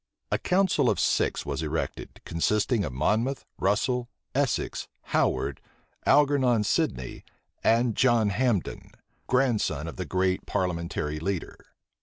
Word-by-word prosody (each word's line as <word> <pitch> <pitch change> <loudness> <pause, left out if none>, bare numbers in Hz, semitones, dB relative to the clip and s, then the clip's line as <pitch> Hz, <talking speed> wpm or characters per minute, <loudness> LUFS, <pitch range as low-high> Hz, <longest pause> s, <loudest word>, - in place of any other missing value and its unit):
A - - +1
council 190 0 +2
of - - 0
six - - +1
was - - -3
erected, - - -4
consisting 105 +6 +1
of 75 - -3
Monmouth, 110 - 0
Russel, 120 +5 +1 0.2
Essex, 135 -3 -1 0.3
Howard, 70 -1 +1 0.5
Algernon 135 -5 +4
Sidney, 65 -10 -1 0.4
and 115 -1 +3
John 120 -5 +3
Hambden, 115 -4 -1 0.3
grandson 110 - +1
of 80 - -7
the 90 - -3
great 95 +2 0
parliamentary 85 -4 -2
leader. 95 +1 -3
105 Hz, 115 wpm, -27 LUFS, 85-125 Hz, 0.5 s, Algernon